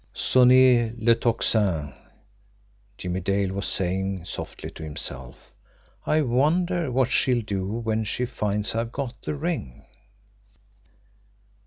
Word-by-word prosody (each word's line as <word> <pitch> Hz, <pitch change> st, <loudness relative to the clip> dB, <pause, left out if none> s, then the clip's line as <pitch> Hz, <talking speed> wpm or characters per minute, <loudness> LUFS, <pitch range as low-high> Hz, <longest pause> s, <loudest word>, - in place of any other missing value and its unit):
"SONNEZ 125 Hz, -2 st, +5 dB
LE 115 Hz, +1 st, +4 dB
TOCSIN," 105 Hz, -, 0 dB, 1.0 s
Jimmie 90 Hz, 0 st, -3 dB
Dale 95 Hz, +1 st, 0 dB
was 100 Hz, +1 st, -2 dB
saying 95 Hz, -1 st, -1 dB
softly 100 Hz, -, -6 dB
to -, -, -12 dB
himself. 70 Hz, -4 st, -7 dB, 0.5 s
"I 155 Hz, 0 st, +3 dB
wonder 155 Hz, +5 st, +1 dB
what 130 Hz, 0 st, +1 dB
she'll 125 Hz, -2 st, +3 dB
do 100 Hz, -3 st, -3 dB
when 110 Hz, +1 st, -2 dB
she 125 Hz, +4 st, -1 dB
finds 105 Hz, -4 st, -2 dB
I've 115 Hz, +1 st, -2 dB
got 130 Hz, -3 st, -5 dB
the -, -, -4 dB
ring?" 145 Hz, -, -4 dB
115 Hz, 115 wpm, -25 LUFS, 95-130 Hz, 1.0 s, SONNEZ